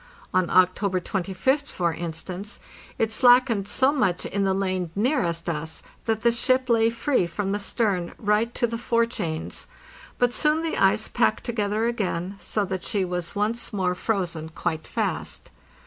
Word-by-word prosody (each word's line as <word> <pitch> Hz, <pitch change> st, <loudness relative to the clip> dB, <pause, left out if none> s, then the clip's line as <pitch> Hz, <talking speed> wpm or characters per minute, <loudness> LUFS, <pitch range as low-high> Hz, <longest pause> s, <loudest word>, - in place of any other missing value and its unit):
On 185 Hz, -1 st, +2 dB
October 185 Hz, +1 st, +3 dB
25th, 195 Hz, -, -1 dB
for 170 Hz, -, -1 dB
instance, 175 Hz, +5 st, -5 dB, 0.4 s
it 225 Hz, -1 st, +1 dB
slackened 245 Hz, -3 st, +4 dB
so 260 Hz, +6 st, +3 dB
much 210 Hz, -, 0 dB
in 200 Hz, 0 st, -1 dB
the 190 Hz, -, +2 dB
lane 185 Hz, -3 st, -1 dB
nearest 200 Hz, -, 0 dB
us 160 Hz, -1 st, -4 dB, 0.2 s
that 220 Hz, -1 st, -1 dB
the 235 Hz, -, +5 dB
ship 255 Hz, +2 st, +2 dB
lay 225 Hz, -1 st, +4 dB
free 230 Hz, -, +1 dB
from 195 Hz, +3 st, -3 dB
the 205 Hz, -, 0 dB
stern 200 Hz, -4 st, -1 dB
right 210 Hz, +2 st, +1 dB
to 240 Hz, -, +2 dB
the 230 Hz, 0 st, -3 dB
fore 235 Hz, -1 st, +2 dB
chains; 170 Hz, -9 st, -4 dB, 0.5 s
but 245 Hz, -1 st, +2 dB
soon 310 Hz, +3 st, +2 dB
the 325 Hz, -, -1 dB
ice -, -, +3 dB
packed -, -, +1 dB
together 215 Hz, -2 st, -1 dB
again, 195 Hz, -5 st, -2 dB
so 210 Hz, -2 st, -1 dB
that 190 Hz, -1 st, -4 dB
she 200 Hz, -3 st, 0 dB
was 180 Hz, 0 st, -4 dB
once 215 Hz, +4 st, -1 dB
more 185 Hz, -4 st, 0 dB
frozen 175 Hz, -5 st, -2 dB
quite 160 Hz, 0 st, -3 dB
fast. -, -, -3 dB
205 Hz, 165 wpm, -25 LUFS, 180-235 Hz, 0.5 s, the